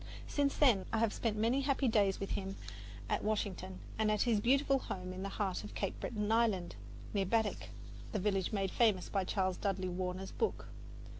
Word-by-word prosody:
Since 285 -1 0
then 240 -10 +4
I 225 - +1
have 225 -1 +2
spent 220 -2 -1
many 235 +6 +2
happy 275 -1 +1
days 205 -4 +3
with 195 - -4
him 195 0 -3 0.5
at - - 0
Washington 190 -3 -2 0.2
and 215 -1 +3
at 210 -1 +3
his 230 -4 +2
beautiful 270 +4 +3
home 185 -6 -5
in 185 - -6
the 195 - -3
heart 195 -2 -2
of 210 - -9
Cape 195 - -2
Breton 210 -2 -2
Island, 220 -6 +2 0.4
near 195 -2 +1
Baddeck, 220 +1 0 0.4
the - - -1
village 195 -2 0
made 195 -3 0
famous 215 -6 +3
by 195 -2 +1
Charles 185 -1 0
Dudley 190 -2 -1
Warner's 185 +1 -3
book. 450 - -2
205 Hz, 190 wpm, -34 LUFS, 190-230 Hz, 0.5 s, then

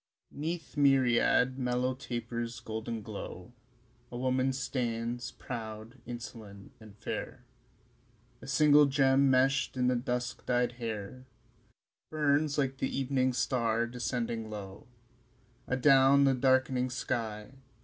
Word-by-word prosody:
II. - - -11
'Neath 160 0 -4
myriad 130 -2 +3
mellow 125 0 0
tapers' 120 -2 -5
golden 110 0 -5
glow 105 0 -8 0.6
A 120 - -5
woman 130 +1 +1
stands, 120 -2 -3
proud, 110 0 -7
insolent 110 -5 -9
and 110 -2 -14
fair; - - -6 1.0
A 135 - -10
single 145 +1 +5
gem 135 0 +3
meshed 130 +1 +2
in 125 0 +2
the 125 - +2
dusk 125 0 -3
dyed 125 -1 +2
hair 115 +1 -6 0.8
Burns 150 -1 +1
like 135 -2 0
the 130 - -1
evening 130 -1 0
star 120 -2 0
descending 120 -2 -3
low 100 -1 -8 0.8
Adown 135 +1 +5
the 135 -1 +4
dark'ning 130 0 +2
sky. 115 -4 -3
125 Hz, 115 wpm, -30 LUFS, 115-135 Hz, 1.0 s, single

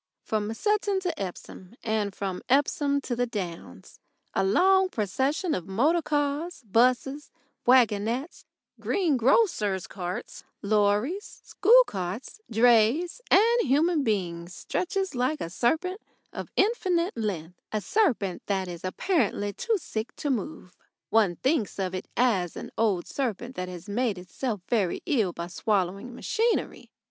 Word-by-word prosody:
From 215 -1 -1
Sutton 415 - +1
to 360 - -3
Epsom 185 +2 -8
and 215 -3 -1
from 190 -2 -4
Epsom 280 +1 +2
to 245 - -3
the 245 +1 0
Downs 185 -7 -7 0.3
a - - +1
long 375 - +4
procession 270 - -1
of 180 - -3
motor 285 - +2
cars, 290 +1 -2
buses, 255 +6 +2 0.4
waggonettes, 245 - +2 0.4
greengrocers' 265 - +2
carts, 180 -1 -6 0.2
lorries, 210 - 0
school 475 +6 +6
carts, 195 - -5
drays, 240 - +3
and 465 +4 +5
human 305 - +2
beings 180 -6 -2
stretches 380 0 -2
like 255 +4 0
a 165 - -5
serpent 355 - 0 0.3
of - - -6
infinite 375 -4 +1
length 180 -7 -4
a 215 - 0
serpent 210 - +1
that 190 -2 0
is 170 -2 -8
apparently 205 - 0
too 460 - 0
sick 225 - -5
to 290 - -2
move. 255 - -4 0.4
One 210 -6 +3
thinks 260 - 0
of 190 -2 -2
it 185 - -5
as 200 -9 +2
an - - -7
old 205 -6 +1
serpent 245 -1 -3
that 180 0 -4
has 180 +1 -9
made 220 0 0
itself 210 +4 -4
very 205 -7 0
ill 230 - +1
by 170 - -5
swallowing 195 +5 -1
machinery. 455 - -1
235 Hz, 135 wpm, -27 LUFS, 195-315 Hz, 0.4 s, school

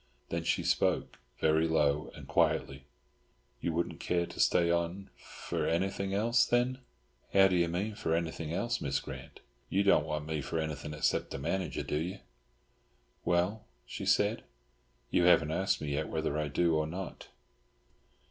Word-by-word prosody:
Then - - -2
she - - +1
spoke, - - +1 0.2
very 80 +1 +3
low 75 -2 +1
and - - -11
quietly. 70 +1 +1 0.7
"You 85 - -1
wouldn't 85 +1 -2
care 85 -1 0
to - - -11
stay 85 -1 +4
on—for 85 +3 -3
anything 95 +3 0
else, 115 +4 +3
then?" 125 +2 +1 0.6
"How 95 0 +8
do 95 - +1
you 85 -1 +3
mean 95 +6 -2
for 80 -6 -1
anything 80 -1 -3
else, 115 +6 -1
Miss 70 -1 0
Grant? - - -9 0.3
You 100 - +2
don't 95 -6 +4
want 75 -1 -3
me 80 -1 -2
for 80 - -3
anything 75 -1 -3
except 75 - 0
as - - -4
manager, 90 -8 -2
do - - -2
you?" 90 +5 -3 1.1
"Well," 90 +5 +1 0.2
she - - -6
said, - - +2 0.7
"you 90 - +3
haven't 85 -3 +5
asked 95 +4 0
me 75 - -3
yet 75 +2 -2
whether 80 -2 -1
I 75 -1 0
do 85 +4 +2
or 80 0 0
not!" 90 +3 -6
85 Hz, 160 wpm, -31 LUFS, 75-95 Hz, 1.1 s, How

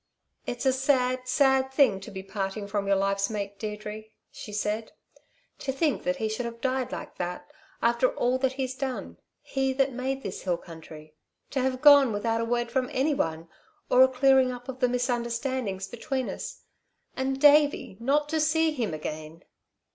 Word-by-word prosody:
"It's 245 +2 -4
a 265 - +4
sad, 255 -1 +1
sad 265 0 +3
thing 265 -8 +4
to 195 - -10
be 190 -1 -7
parting 195 +1 -4
from 200 -1 -2
your 200 - +4
life's 195 0 +1
mate, 200 -2 -5
Deirdre," 210 0 -6 0.3
she 210 - -9
said. 210 +1 -2 0.7
"To 270 - -2
think 285 +1 0
that 275 0 +1
he 225 -5 -2
should 220 +3 -3
have 235 0 -8
died 255 0 -1
like - - -7
that... 180 +11 -5 0.3
after 235 +2 +3
all 250 +1 +1
that 265 0 +1
he's 260 -1 -3
done 260 -1 -5 0.3
he 270 -1 -1
that 270 0 +1
made 265 +2 -3
this 195 - -5
hill 180 -2 0
country. 160 -2 -12 0.4
To 275 - -1
have 255 0 -1
gone 285 -4 +8
without 225 +2 0
a - - -1
word 240 0 -1
from 255 0 0
anyone, 170 - 0 0.4
or 250 - +6
a 260 - +9
clearing 260 0 +4
up 245 0 -9
of 260 -1 -6
the 250 -1 +3
misunderstandings 240 -4 -2
between 260 +3 -3
us. - - -7 0.5
And 265 +1 -1
Davey 290 -7 +4
not 285 +5 +1
to 320 0 0
see 320 +1 +2
him 235 - -2
again!" 155 +2 -7
250 Hz, 180 wpm, -27 LUFS, 210-265 Hz, 0.7 s, a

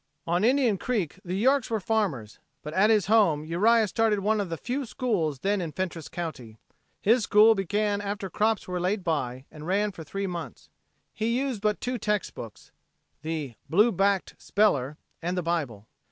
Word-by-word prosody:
On 175 +3 +1
Indian 245 -4 +3
Creek 195 -8 -2
the 180 0 -3
Yorks 260 +5 +2
were 225 -1 0
farmers, 185 - -1 0.2
but 150 - -6
at 195 +4 +4
his 215 -4 +4
home 195 -9 +3
Uriah 215 +7 +3
started 220 +1 +1
one 210 +1 +1
of 195 - -4
the 165 - -3
few 255 - -3
schools 190 - -1
then 200 0 +1
in 165 -3 -4
Fentress 170 -1 -4
county. 130 -10 -6 0.5
His 230 +4 +4
school 215 +2 +6
began 205 +1 0
after 205 0 -4
crops 215 +3 0
were 180 -1 -2
laid 185 +3 -1
by 130 -6 -2
and 155 +1 -10
ran 205 +3 +1
for 170 -4 -9
three 195 +6 -4
months. 175 -3 -6 0.4
He 230 +2 0
used 260 -5 -2
but 210 -1 0
two 250 -1 -3
text 210 -3 -1
books 115 -3 -10 0.5
the 155 -4 -4 0.2
"blue 210 +8 +4
backed 195 0 +1
speller" 150 -9 +1 0.2
and 175 +2 -2
the 180 - -1
Bible. 145 -12 -2
195 Hz, 180 wpm, -27 LUFS, 165-215 Hz, 0.5 s, school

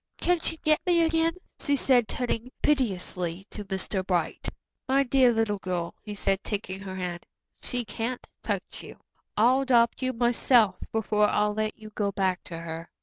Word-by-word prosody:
Can 355 -1 +2
she 325 0 -3
get 310 -1 +2
me 340 -1 +5
again?" 325 0 +2 0.3
she 285 - +2
said, 250 -4 +3
turning 245 0 -2
piteously 190 - 0
to 210 - -6
Mr. 190 0 -2
Bright. 175 -4 -1 0.4
"My 275 +1 +4
dear 260 -1 +4
little 225 -3 0
girl," 180 -3 -3
he 210 -1 -7
said, 195 -1 0
taking 195 -2 -3
her 190 -1 -7
hand, 180 -2 -4 0.4
"she 245 -2 -2
can't 235 +2 -3 0.2
touch - - -3
you. - - -11 0.4
I'll 250 +5 +5
adopt 240 -3 +3
you 255 0 +1
myself 235 -4 +3
before 210 -1 +2
I'll 210 0 +2
let 215 0 -2
you 215 -1 -11
go 205 -1 -1
back 190 -2 0
to 170 - -6
her. 165 0 -6
215 Hz, 170 wpm, -27 LUFS, 190-255 Hz, 0.4 s, me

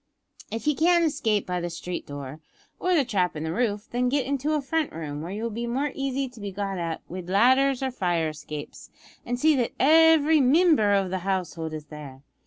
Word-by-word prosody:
"If 225 +4 -4
ye 300 - +3
can't 340 +3 +3
escape 230 -10 0
by 180 -1 -2
the 175 - -3
street 175 +1 -6
door, 145 +1 -7 0.4
or 365 0 +1
the 290 -5 +3
trap 190 -8 0
in 150 - -4
the 160 0 -3
roof, 210 -1 -1
then 245 +1 +1
get 275 0 0
into 280 +2 -1
a - - +1
front 315 +2 -1
room, 150 -2 -6
where 170 +3 -6
you 210 +3 -5
will 230 - -2
be 235 +2 -4
more 270 +4 -1
easy 275 0 -2
to 245 -2 -15
be 200 -1 -5
got 195 -1 -3
at 165 -1 -3
wid 180 0 -7
ladders 260 +6 +3
or 265 - -1
fire 175 -8 0
escapes, 150 -1 -8 0.4
an' 245 +1 -1
see 310 +4 +4
that 240 -2 -1
every 315 0 +5
mimber 275 - +4
o' 195 -1 +1
the 185 +1 -3
household 180 -4 -3
is 155 -1 -7
there. 145 -3 -11
220 Hz, 215 wpm, -25 LUFS, 175-275 Hz, 0.4 s, every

